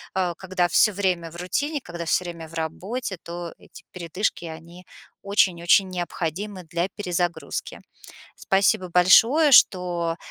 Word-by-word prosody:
э, 180 -2 0
когда 185 -2 -1
всё 210 +5 +3
время 180 -4 -1
в 170 - -14
рутине, 285 - -2
когда 170 -5 -7
всё 180 - +1
время 170 -2 -7
в 160 - -17
работе, 190 +7 -4
то 170 0 -7
эти - - -16
передышки- 180 +1 -3
они 165 +2 -11 0.4
очень-очень 190 -2 +3
необходимы 180 +2 -4
для 170 +2 -2
перезагрузки. 175 -4 -3 0.6
Спасибо 195 -1 +1
большое, 225 - +5
что 175 -8 +4
180 Hz, 130 wpm, -24 LUFS, 170-195 Hz, 0.6 s, большое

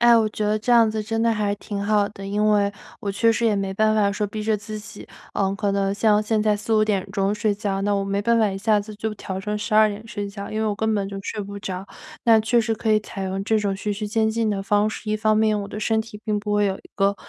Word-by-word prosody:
哎， 240 0 +7
我 220 -1 +2
觉 215 - -3
得 210 +1 +1
这 230 +3 0
样 230 -2 +6
子 215 0 -2
真 225 +1 -2
的 230 0 +3
还 210 -2 0
挺 205 0 -6
好 205 0 +2
的。 195 -1 -9
因 205 +2 0
为 205 -1 +2 0.3
我 200 - -3
确 230 +3 +3
实 230 +1 0
也 215 - +3
没 195 -1 -2
办 215 +2 +2
法 205 -2 +3
说 210 +1 -1
逼 215 +1 -5
着 215 0 +1
自 215 +1 -7
己， 215 0 -11 0.3
呃， 195 -1 0
可 205 0 -1
能 195 0 0
像 210 0 +3
现 215 0 0
在 210 -1 +2
4-5 215 +1 +2
点 200 -2 -1
钟 195 +1 +1
睡 210 0 0
觉， 200 -2 -2
那 205 +1 +1
我 200 0 0
没 200 0 -1
办 235 +3 +2
法 220 -3 +3
一 195 - -4
下 210 +1 +2
子 210 +1 -9
就 215 +1 -3
调 190 -2 -5
成 210 +2 -3
12 215 +1 +3
点 210 +1 -6
睡 205 -2 -4
觉， 200 0 -7
因 215 - -2
为 220 - 0
我 210 - 0
根 220 +1 0
本 200 -2 -1
就 200 - -6
睡 210 - -4
不 200 0 -6
着。 190 0 -5 0.4
那 225 -2 +6
确 235 +2 +2
实 225 0 0
可 220 0 -2
以 215 - +5
采 205 -2 -7
用 190 +1 -3
这 220 +1 +2
种 200 -2 0
徐 205 +1 -2
徐 210 +1 -4
渐 220 0 +1
进 220 0 0
的 200 -1 -1
方 205 +2 +2
式， 215 - -7
一 215 - +1
方 215 0 +2
面 215 -1 +2
我 200 - -7
的 210 - -6
身 220 +1 +1
体 220 -1 -9
并 210 -2 0
不 210 0 -3
会 205 0 +3
有 190 -1 -1
一 - - -18
个， 200 0 +2
210 Hz, 310 characters per minute, -23 LUFS, 200-220 Hz, 0.4 s, 哎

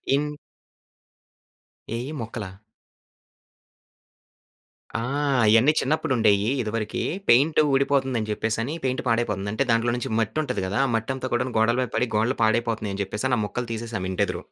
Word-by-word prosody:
In 150 +1 0 1.7
ఏయి 125 +4 -4
మొక్కలా? 115 -3 -5 2.5
ఆ! - - +1 0.5
అయన్నీ 115 +7 +6
చిన్నప్పుడు 150 +1 0
ఉండేవి. 105 -2 +3 0.2
ఇదివరకి, 110 -1 -3 0.3
పెయింట్ 140 +7 +5
ఊడిపోతుంది 135 -2 +2
అని 110 -1 -4
చెప్పేసి 110 +1 -1
అని 140 +7 -3
పెయింట్ 130 -1 0
పాడైపోతుంది. 105 -4 0
అంటే 140 - +1
దాంట్లో 115 +1 +2
నుంచి 125 0 -4
మట్టుంటది 110 0 -1
కదా. 100 - -2
ఆ - - 0
మట్టంతా 130 +3 -2
కూడాను 125 +1 0
గోడల 115 +2 +3
మీద 125 - -2
పడి, 125 - +1
గోడలు 115 +4 +1
పాడైపోతున్నాయి 110 -2 0
అని 100 - -3
చెప్పేసి 105 +6 -3
అని 125 - +2
ఆ - - 0
మొక్కలు 120 +3 -4
తీసేసాం 115 -4 -4
ఇంటి 95 +2 +1
ఎదురు. 90 - -5
115 Hz, 150 wpm, -24 LUFS, 110-130 Hz, 2.5 s, అయన్నీ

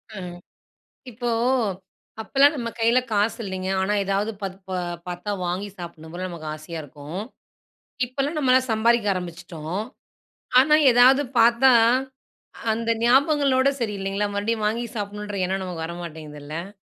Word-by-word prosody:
அ - - -7 0.9
இப்போ 240 +1 -3 0.9
அப்பலாம் 280 +6 +4
நம்ம 235 -3 -3
கையில 230 +2 +4
காசு 210 +2 +1
இல்லங்க. 190 -1 -4
ஆனா 205 +2 +1
ஏதாவது 200 +2 0
ப 195 - 0 0.2
ப - - -5 0.4
பார்த்தா 180 +3 -5 0.2
வாங்கி 190 +4 -2
சாப்பிடணும் 165 -2 -9
போல 185 +1 -3
நமக்கு 165 -3 -8
ஆசையா 155 +2 -8
இருக்கும். 150 +6 -7 0.8
இப்பலாம் 275 +5 -2
நம்மலாம் 260 -2 +3
சம்பாரிக்க 230 0 +2
ஆரம்பிச்சுட்டோம். 170 -1 -5 0.8
ஆனா 300 +3 +5 0.2
ஏதாவது 255 +4 +6 0.2
பார்த்தா, 240 +3 +6 1.0
அந்த 230 +1 -1
ஞாபகங்களோட 270 +1 +4
சரி, 220 -4 -1
இல்லங்களா? 195 +2 -1
மறுபடியும் 215 +1 -1
வாங்கி 230 +3 -1
சாப்பிடணுன்ற 205 0 -4
எண்ணம் 190 +1 -2
நமக்கு 165 -3 -4
வர 170 +1 -6
மாட்டேங்குதுல்ல? 155 +1 -7
205 Hz, 130 wpm, -24 LUFS, 175-240 Hz, 1.0 s, ஏதாவது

